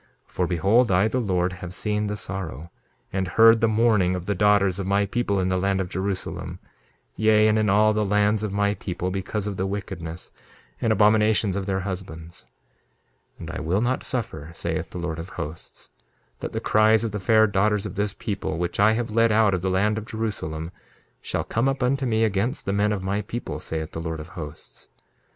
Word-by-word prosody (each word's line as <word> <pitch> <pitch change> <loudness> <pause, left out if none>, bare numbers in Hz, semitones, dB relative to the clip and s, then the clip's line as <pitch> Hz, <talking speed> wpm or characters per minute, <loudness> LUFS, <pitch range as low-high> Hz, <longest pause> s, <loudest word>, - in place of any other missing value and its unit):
2:31 - - -27
For 90 - 0
behold, 100 +7 +3
I, 95 +3 +4
the 125 +3 -1
Lord, 90 -4 0
have 90 0 -7
seen 105 +1 -1
the 105 0 -3
sorrow, 85 -6 -5 0.4
and 95 -1 -1
heard 115 +3 +6
the 115 - +4
mourning 105 -5 +3
of 90 -1 -5
the 100 - 0
daughters 100 -1 +3
of 95 - -3
my 100 +1 +2
people 100 -1 -1
in 95 0 0
the 95 0 +1
land 95 +1 +1
of 95 -2 -2
Jerusalem, 95 +1 -3 0.6
yea, 110 0 +4
and 110 0 +3
in 105 -2 +2
all 105 +2 +4
the 105 0 +1
lands 105 +1 +2
of 105 -2 -2
my 100 +1 +1
people, 90 -2 -4
because 95 +2 -3
of 100 -2 -4
the 95 - -1
wickedness 90 -4 -6 0.5
and 115 - +2
abominations 105 -1 +3
of 100 0 -3
their 95 -1 0
husbands. 90 -4 -7 0.9
2:32 - - -34
And 80 - -6
I 90 - -5
will 90 +6 0
not 125 +2 0
suffer, 80 - -4
saith - - -3
the - - -8
Lord 85 -2 -4
of 85 +3 -7
Hosts, 80 -3 -8 0.5
that - - -5
the - - -2
cries 110 +1 +3
of 115 - -2
the 105 - -3
fair 110 +3 +4
daughters 105 0 +1
of 100 - -5
this 105 0 -2
people, 100 -7 -3
which 85 +2 -3
I 110 +2 +5
have 115 0 -2
led 115 +1 +3
out 105 -2 +4
of 90 - -1
the 95 - -1
land 105 +4 +1
of 110 - -10
Jerusalem, 95 -8 -4 0.5
shall - - -2
come 115 +4 0
up 135 -1 -2
unto 135 +1 +1
me 110 -1 +2
against 110 +3 -1
the 100 - -1
men 105 +1 +2
of 100 -3 -2
my 100 +2 -1
people, 115 +4 -5
saith 80 -1 -4
the 80 - -5
Lord 80 -1 -4
of 75 +2 -9
Hosts. 80 -4 -10
100 Hz, 215 wpm, -24 LUFS, 90-110 Hz, 0.9 s, heard